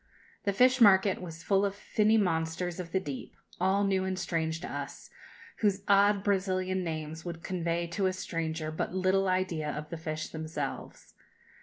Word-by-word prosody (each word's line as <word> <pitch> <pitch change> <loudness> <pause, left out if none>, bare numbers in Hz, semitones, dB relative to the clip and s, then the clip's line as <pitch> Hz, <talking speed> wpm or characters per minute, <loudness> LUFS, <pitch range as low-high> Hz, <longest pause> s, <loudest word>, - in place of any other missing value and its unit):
The 200 - +3
fish 255 +4 +4
market 195 -3 +6
was 165 -2 -8
full 195 -1 +3
of 200 -1 0
finny 215 +2 +2
monsters 170 -2 0
of 170 -2 -6
the 190 - +2
deep, 145 -7 -7 0.2
all 190 +2 +2
new 190 -1 +2
and 190 0 -2
strange 160 -2 -1
to - - -5
us, 140 0 -7 0.5
whose 200 -2 +1
odd 200 0 +4
Brazilian 185 -2 0
names 160 -1 -4
would 170 -2 -6
convey 170 -2 -1
to 190 +3 0
a 185 - 0
stranger 165 -3 -3
but 155 +3 -3
little 190 +1 +2
idea 185 -5 0
of 150 0 -5
the 170 - -4
fish 155 -1 -4
themselves. 155 -3 -6
185 Hz, 170 wpm, -30 LUFS, 160-195 Hz, 0.5 s, market